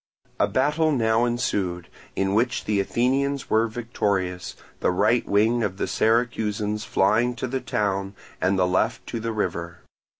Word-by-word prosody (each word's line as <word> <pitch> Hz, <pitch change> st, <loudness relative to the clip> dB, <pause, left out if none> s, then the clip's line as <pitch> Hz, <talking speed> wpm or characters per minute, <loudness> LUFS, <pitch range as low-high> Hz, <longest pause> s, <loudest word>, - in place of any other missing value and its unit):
A -, -, +4 dB
battle 150 Hz, +8 st, +1 dB
now 115 Hz, -3 st, +2 dB
ensued, 95 Hz, -7 st, -1 dB, 0.3 s
in 95 Hz, 0 st, 0 dB
which 125 Hz, +4 st, +1 dB
the 105 Hz, -1 st, +1 dB
Athenians 135 Hz, +6 st, 0 dB
were 110 Hz, +1 st, +3 dB
victorious, 100 Hz, -6 st, -2 dB, 0.2 s
the -, -, +1 dB
right 115 Hz, +6 st, +2 dB
wing 110 Hz, +4 st, +3 dB
of 100 Hz, -4 st, -2 dB
the -, -, -1 dB
Syracusans 105 Hz, 0 st, 0 dB
flying 110 Hz, +6 st, +2 dB
to 125 Hz, -, -3 dB
the 130 Hz, +1 st, -3 dB
town 100 Hz, -4 st, -1 dB, 0.3 s
and 95 Hz, 0 st, +2 dB
the 90 Hz, -, +3 dB
left 100 Hz, +6 st, 0 dB
to 115 Hz, -, -4 dB
the 115 Hz, +1 st, -3 dB
river. 85 Hz, -5 st, -3 dB
110 Hz, 155 wpm, -24 LUFS, 95-120 Hz, 0.3 s, A